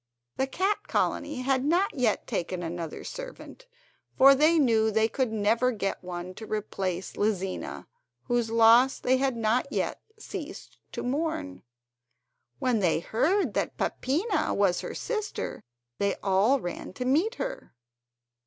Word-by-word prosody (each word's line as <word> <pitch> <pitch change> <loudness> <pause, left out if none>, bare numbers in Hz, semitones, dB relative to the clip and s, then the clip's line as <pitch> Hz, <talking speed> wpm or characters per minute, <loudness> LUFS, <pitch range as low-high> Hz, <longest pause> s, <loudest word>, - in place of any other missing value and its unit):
The 265 - +1
cat 385 +8 -1
colony 275 -4 -1
had 265 0 +1
not 350 +7 +2
yet 250 -7 0
taken 175 +1 -3
another 165 -1 -5
servant, - - -9 0.5
for 275 +1 +9
they 310 +5 +4
knew 225 -6 +3
they 220 +1 +2
could 250 +1 -1
never 225 +4 +2
get 195 -5 -3
one 180 0 -6
to 220 +3 -9
replace 190 -4 -3
Lizina, 195 -3 -2 0.4
whose 240 -2 0
loss 230 +3 +6
they 255 +1 +2
had 265 -2 0
not 230 +5 +1
yet - - -2 0.2
ceased 385 -5 -8
to - - -4
mourn. 250 - -2 1.0
When 250 -4 +1
they 175 -5 +2
heard 300 - +1
that - - -2
Peppina 350 - 0
was 195 -3 +2
her - - -6
sister, 430 -3 -4 0.4
they 200 -1 +1
all 200 +8 +3
ran 175 -2 -6
to 250 - -4
meet 330 - +2
her. - - -6
245 Hz, 140 wpm, -27 LUFS, 200-295 Hz, 1.0 s, for